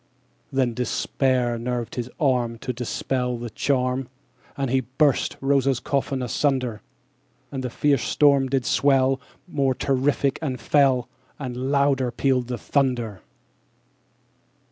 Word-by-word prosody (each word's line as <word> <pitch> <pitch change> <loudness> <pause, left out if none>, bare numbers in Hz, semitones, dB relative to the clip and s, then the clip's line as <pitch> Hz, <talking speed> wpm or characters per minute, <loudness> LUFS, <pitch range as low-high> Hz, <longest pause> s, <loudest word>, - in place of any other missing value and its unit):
_75 - - -13
14. - - -3
Then 125 -3 +2
despair 125 0 0
nerved 120 -1 -3
his 125 0 -4
arm 125 -5 +1
To 125 - -4
dispel 125 +1 -2
the 120 -1 -6
charm, 130 -1 0 0.5
And 135 -3 -1
he 135 - +3
burst 130 +3 +1
Rosa's 135 -2 +2
coffin 135 0 -1
asunder. 125 -3 0 0.7
And 135 -2 -4
the 125 - -2
fierce 140 +1 +1
storm 140 -2 +3
did 130 -2 0
swell 135 -1 +3 0.3
More 135 -6 0
terrific 135 +1 +1
and 130 -6 -3
fell, 130 -1 +3 0.3
_80 140 - -4
And 125 +1 -3
louder 140 -3 +2
pealed 130 0 0
the 125 -1 -3
thunder. 120 - -1
130 Hz, 135 wpm, -24 LUFS, 125-135 Hz, 0.7 s, he